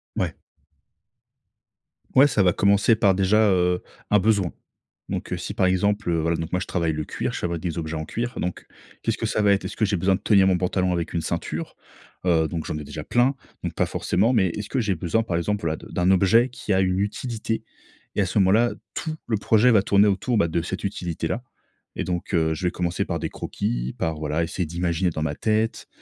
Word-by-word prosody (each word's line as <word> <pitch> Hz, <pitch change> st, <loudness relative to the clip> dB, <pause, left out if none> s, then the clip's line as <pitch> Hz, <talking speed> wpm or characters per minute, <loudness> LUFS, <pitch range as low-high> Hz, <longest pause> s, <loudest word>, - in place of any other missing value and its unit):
Ouais. -, -, -1 dB, 1.8 s
Ouais, 135 Hz, +2 st, +8 dB
ça 105 Hz, -8 st, +2 dB
va 90 Hz, -, +4 dB
commencer 100 Hz, +4 st, +4 dB
par 100 Hz, -4 st, +3 dB
déjà, 105 Hz, +3 st, +4 dB
heu, 90 Hz, -1 st, +2 dB, 0.3 s
un 105 Hz, -, +6 dB
besoin. 100 Hz, -3 st, +2 dB, 0.6 s
Donc -, -, -3 dB
heu, -, -, -1 dB
si -, -, -5 dB
par -, -, +2 dB
exemple, 100 Hz, +2 st, +1 dB
heu, 85 Hz, -, +1 dB
voilà, 85 Hz, +1 st, 0 dB
donc 80 Hz, 0 st, -5 dB
moi, 90 Hz, -, +1 dB
je -, -, -5 dB
travaille 85 Hz, -3 st, 0 dB
le 75 Hz, 0 st, -3 dB
cuir, -, -, -3 dB
je -, -, -3 dB
travaille 85 Hz, -1 st, -2 dB
des 85 Hz, 0 st, -4 dB
objets 80 Hz, -1 st, -3 dB
en 80 Hz, -, -4 dB
cuir, 120 Hz, +7 st, -4 dB
donc, 90 Hz, 0 st, -4 dB, 0.3 s
qu'est-ce -, -, -1 dB
que -, -, -3 dB
ça 110 Hz, -, 0 dB
va 100 Hz, -, +4 dB
être? 100 Hz, -, -1 dB
Est-ce -, -, -5 dB
que 110 Hz, -, +2 dB
j'ai 100 Hz, -1 st, 0 dB
besoin 95 Hz, +2 st, +2 dB
de -, -, -5 dB
tenir 100 Hz, -3 st, +5 dB
mon 90 Hz, -2 st, +3 dB
pantalon 90 Hz, 0 st, 0 dB
avec 85 Hz, -2 st, -3 dB
une 85 Hz, -, 0 dB
ceinture? -, -, -4 dB, 0.5 s
Heu, 80 Hz, -3 st, +3 dB
donc, 80 Hz, -1 st, -4 dB
j'en -, -, -3 dB
ai 75 Hz, -, -6 dB
déjà -, -, -7 dB
plein, 125 Hz, +3 st, +2 dB, 0.3 s
donc, -, -, -3 dB
pas -, -, +2 dB
forcément, 110 Hz, +7 st, +1 dB
mais 95 Hz, -6 st, +3 dB
est-ce 105 Hz, +4 st, -5 dB
que 130 Hz, -, 0 dB
j'ai 100 Hz, -4 st, 0 dB
besoin 90 Hz, +7 st, 0 dB
par 85 Hz, -6 st, -2 dB
exemple, 105 Hz, +4 st, -1 dB
voilà, 80 Hz, -1 st, -1 dB
de -, -, -13 dB
d'un 90 Hz, +2 st, +2 dB
objet 105 Hz, +7 st, +4 dB
qui 120 Hz, -3 st, -6 dB
a 95 Hz, -, +3 dB
une 95 Hz, 0 st, +1 dB
utilité? 110 Hz, +2 st, -2 dB, 0.5 s
Et 105 Hz, -, +2 dB
à -, -, +2 dB
ce 100 Hz, -, -2 dB
moment-là, 105 Hz, +5 st, +4 dB, 0.2 s
tout 160 Hz, -1 st, -3 dB
le 110 Hz, -3 st, +1 dB
projet 110 Hz, +4 st, +4 dB
va 105 Hz, -3 st, +5 dB
tourner 100 Hz, +1 st, +4 dB
autour, 105 Hz, +4 st, +1 dB
bah, 85 Hz, -, +3 dB
de 85 Hz, +1 st, 0 dB
cette 95 Hz, +4 st, -5 dB
utilité-là 90 Hz, +2 st, -3 dB, 0.5 s
et -, -, -2 dB
donc 90 Hz, +2 st, -3 dB
heu, 80 Hz, -2 st, +2 dB
je 90 Hz, -, -4 dB
vais -, -, 0 dB
commencer 85 Hz, -1 st, -1 dB
par -, -, -2 dB
des -, -, -3 dB
croquis, -, -, -3 dB
par, 80 Hz, -1 st, -1 dB
voilà, 75 Hz, +2 st, -1 dB
essayer 90 Hz, +2 st, -2 dB
d'imaginer 85 Hz, +2 st, -1 dB
dans 80 Hz, -, -4 dB
ma 75 Hz, -1 st, -2 dB
tête. 110 Hz, +1 st, 0 dB
95 Hz, 230 wpm, -24 LUFS, 85-105 Hz, 1.8 s, Ouais